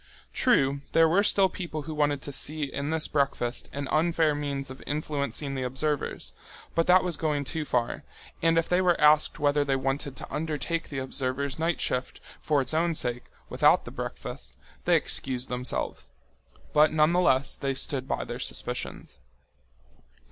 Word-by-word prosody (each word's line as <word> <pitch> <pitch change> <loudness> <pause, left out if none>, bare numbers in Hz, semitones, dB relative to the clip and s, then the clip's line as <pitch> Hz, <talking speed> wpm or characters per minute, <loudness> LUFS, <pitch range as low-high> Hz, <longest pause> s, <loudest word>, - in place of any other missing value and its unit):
True, 140 +1 +2
there 165 0 +6
were 180 +5 +3
still 200 -2 +5
people 170 -5 -6
who 155 +2 -6
wanted 145 -3 0
to 145 - -5
see 150 +3 0
in 140 +1 -3
this 160 -1 +2
breakfast 135 -4 -1
an 140 0 -4
unfair 160 -1 +2
means 140 -2 -4
of 130 - -10
influencing 145 -2 -2
the 135 - -3
observers, 135 +4 -2 0.4
but 165 - +1
that 180 +1 +6
was 180 -3 -2
going 150 -3 -1
too 155 +2 -3
far, 120 -4 -1 0.4
and 165 0 +3
if 165 - +2
they 180 +1 +2
were 180 -2 +2
asked 150 0 +4
whether 145 0 +2
they 140 -1 0
wanted 135 +1 -2
to - - -8
undertake 160 +2 -2
the 145 - -5
observers' 135 +2 -2
night 165 +1 0
shift 125 +1 -2 0.2
for 150 -3 +1
its 130 - -4
own 165 +1 +1
sake, 125 -4 0 0.2
without - - +3
the - - -8
breakfast, - - -6 0.3
they - - +4
excused 130 -1 +1
themselves. 125 0 -3 0.6
But 150 +1 +5
nonetheless 155 -3 +3
they 135 -1 -2
stood 130 0 -1
by - - -2
their - - -6
suspicions. 65 - -4
145 Hz, 165 wpm, -27 LUFS, 135-160 Hz, 0.6 s, there